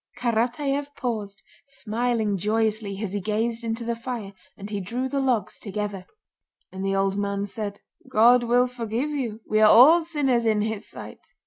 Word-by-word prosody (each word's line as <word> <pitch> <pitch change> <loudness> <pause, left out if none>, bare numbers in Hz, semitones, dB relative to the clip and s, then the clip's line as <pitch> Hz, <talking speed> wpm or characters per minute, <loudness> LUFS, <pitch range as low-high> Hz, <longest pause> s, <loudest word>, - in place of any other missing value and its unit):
'" - - -28
Karatáev 255 +5 -1
paused, 215 -5 -4 0.2
smiling 230 -4 -1
joyously 210 0 -1
as 200 -2 -4
he 205 - -2
gazed 225 +3 -1
into 230 +1 -3
the 235 0 -2
fire, 230 -4 -6 0.2
and 200 - -8
he 205 -2 -2
drew 245 +8 -3
the 275 +1 -2
logs 255 -5 0
together. 200 -2 -5 0.6
"And 190 +1 -6
the 195 0 0
old 195 +1 +1
man 200 0 -1
said, 205 0 -6 0.3
'God 240 +3 +6
will 240 +1 +3
forgive 245 +3 -3
you, 235 -7 -3
we 215 - +2
are 215 0 +7
all 305 +11 +8
sinners 270 -8 0
in 215 -1 +2
His 220 -1 -3
sight. - - -10
225 Hz, 175 wpm, -25 LUFS, 205-245 Hz, 0.6 s, all